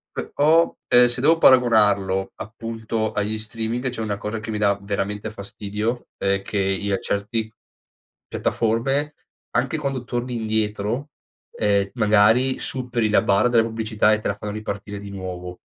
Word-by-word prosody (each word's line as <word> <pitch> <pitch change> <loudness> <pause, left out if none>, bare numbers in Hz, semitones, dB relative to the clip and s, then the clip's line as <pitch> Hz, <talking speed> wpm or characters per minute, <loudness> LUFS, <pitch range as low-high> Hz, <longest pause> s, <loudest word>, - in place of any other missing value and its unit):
Però, 160 +3 +2
ehm, 125 0 +7
se 120 +1 0
devo 165 +3 +5
paragonarlo 105 - +4
appunto 110 0 -4
agli 105 +1 -1
streaming, 115 +3 -3
c'è 120 -2 -4
una 105 -2 -2
cosa 105 +2 -4
che 110 - -5
mi 105 - -2
dà 100 -1 +2
veramente 100 +1 -3
fastidio 105 +3 -4
è 100 0 0
che 105 - -4
io 95 +1 0
a - - -3
certi 110 +2 -2 0.8
piattaforme 135 +6 0 0.4
anche 135 +5 0
quando 135 -4 -3
torni 120 0 -3
indietro, 110 +4 -2 0.4
ehm, 100 -1 +1
magari 110 +4 +4
superi 120 -4 -1
la 105 - +4
barra 100 +5 +3
della 115 -2 +4
pubblicità 110 -1 +1
e 105 - +1
te - - -3
la 100 - -1
fanno 105 0 -6
ripartire 105 -1 -5
di 100 - -9
nuovo. 90 -2 -7
110 Hz, 155 wpm, -23 LUFS, 100-120 Hz, 0.8 s, ehm